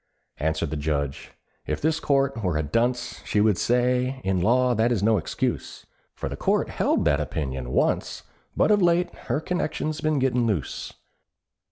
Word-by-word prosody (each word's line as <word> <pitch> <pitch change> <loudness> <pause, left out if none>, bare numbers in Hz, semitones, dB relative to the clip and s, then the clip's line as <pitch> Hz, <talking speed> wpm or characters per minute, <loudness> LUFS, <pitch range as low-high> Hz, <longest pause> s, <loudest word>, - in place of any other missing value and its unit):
Answered 80 +1 -1
the 80 - -2
Judge, 70 -2 -2 0.4
"If - - -1
this 160 +1 +1
Court 135 -5 +1
were 90 -5 0
a 80 - 0
dunce, 120 - -1
She 105 - 0
would 105 -3 +3
say, 125 +2 +1
in 95 -2 0
law 125 +5 +3
that 115 +1 +2
is 105 -5 0
no 110 -1 +4
excuse; 80 - -3 0.3
For - - -4
the - - -4
Court - - +1
held - - +1
that 75 0 +3
opinion 65 -4 -3
once, - - 0 0.3
But - - +4
of 205 -1 +4
late 175 0 +2 0.2
her - - +1
connection's 155 -2 -2
been 155 -1 +1
gettin' 125 -3 +1
loose. 95 - -2
120 Hz, 170 wpm, -25 LUFS, -, 0.4 s, no